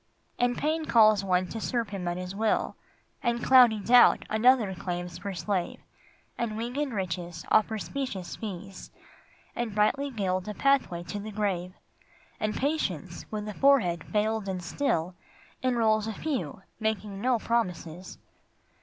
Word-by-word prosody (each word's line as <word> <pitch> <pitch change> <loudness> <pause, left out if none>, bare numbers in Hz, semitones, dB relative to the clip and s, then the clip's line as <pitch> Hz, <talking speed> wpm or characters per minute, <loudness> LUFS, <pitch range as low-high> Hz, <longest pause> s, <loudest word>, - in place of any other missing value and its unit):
And 245 0 +2
Pain 315 +1 0
calls 215 -5 +5
one 185 -1 +2
to 225 - -5
serve 235 -3 -1
him 190 -3 -5
at 175 0 -1
his 180 +1 -5
will, 220 +1 0 0.5
And 235 -1 0
cloudy 245 -4 +6
Doubt 240 +4 +5
another 220 -2 +4
claims 175 -1 -5
for 200 +1 -4
slave, 185 -1 -2 0.6
And 220 -2 -2
winged 255 +5 -2
Riches 175 -4 -4
offer 220 +1 +3
specious 195 -1 -4
fees 195 -2 -7 0.7
And 235 -4 -3
brightly 275 +7 +2
gild 185 -6 -2
a 210 - -4
pathway 270 -11 +1
to 205 +4 -5
the 210 +2 -6
grave, 195 -4 -2 0.6
And 215 -1 -1
Patience, 190 - -2
with 210 -1 -4
a 210 - -4
forehead 200 - +3
veiled 215 -1 -1
and 185 -2 -3
still, 175 - -1 0.5
Enrols 225 -4 +2
a 220 - -3
few, 200 - -4 0.2
making 215 -2 -2
no 250 +1 +2
promises. 185 -7 -3
210 Hz, 145 wpm, -28 LUFS, 185-235 Hz, 0.7 s, cloudy